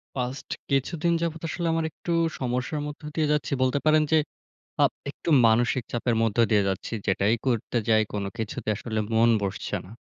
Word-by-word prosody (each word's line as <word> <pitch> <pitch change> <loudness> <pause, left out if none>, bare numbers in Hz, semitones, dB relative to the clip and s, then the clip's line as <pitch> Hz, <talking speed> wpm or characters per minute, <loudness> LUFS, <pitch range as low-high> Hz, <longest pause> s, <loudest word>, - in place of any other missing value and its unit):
Past 125 +1 -4 0.2
কিছুদিন 165 +5 +1
যাবত, 165 -1 -2
আসলে 170 -1 -2
আমার 165 0 0
একটু 170 - -6 0.3
সমস্যার 125 +4 -2
মধ্য 150 +1 -8
দিয়ে 155 -2 +1
যাচ্ছি। 150 0 0
বলতে 130 +2 +2
পারেন 155 0 +5
যে 160 - +6 0.7
আপ - - +4 0.2
একটু 145 - -9 0.2
মানসিক 120 +3 +3
চাপের 120 0 0
মধ্য 115 0 0
দিয়ে 105 -2 +3
যাচ্ছি। 95 +3 -3
যেটাই 100 +3 +2
করতে 120 -1 0
যাই, 110 -1 +5
কোন 100 -1 -2
কিছুতে 110 -1 -4
আসলে 110 +1 -4 0.2
মন 115 +1 +5
বসছে 100 -1 -3
না। 90 - -13
125 Hz, 175 wpm, -26 LUFS, 110-150 Hz, 0.7 s, যে